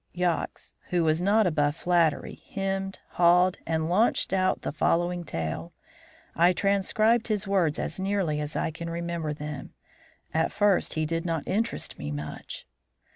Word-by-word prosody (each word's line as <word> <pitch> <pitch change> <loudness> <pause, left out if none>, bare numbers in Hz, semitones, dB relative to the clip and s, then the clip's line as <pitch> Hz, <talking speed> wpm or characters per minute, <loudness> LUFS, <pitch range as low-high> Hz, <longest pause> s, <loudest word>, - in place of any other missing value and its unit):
Yox, 175 -2 -2 0.2
who 175 -1 +2
was 160 +1 +2
not 205 +3 +4
above 145 -4 +1
flattery, 170 -3 +1
hemmed, 195 0 -2
hawed, 180 +1 +4
and 160 -1 0
launched 195 +3 +2
out 185 -1 +3
in - - -24
the - - -2
following 175 +3 +1
tale. 80 - -4 0.6
I 175 +2 +5
transcribe 215 +4 +2
his 210 -4 -1
words 180 -6 +2
as - - -3
nearly 190 -6 0
as 150 0 -5
I 160 - 0
can 170 +1 -6
remember 170 -2 -3
them. 150 -1 -6 0.6
At 160 0 +1
first 205 -3 +2
he 155 0 0
did 165 +1 -1
not 165 -4 -2
interest 225 +4 -2
me 75 - -4
much. 75 +1 -6
170 Hz, 155 wpm, -27 LUFS, 155-195 Hz, 0.6 s, I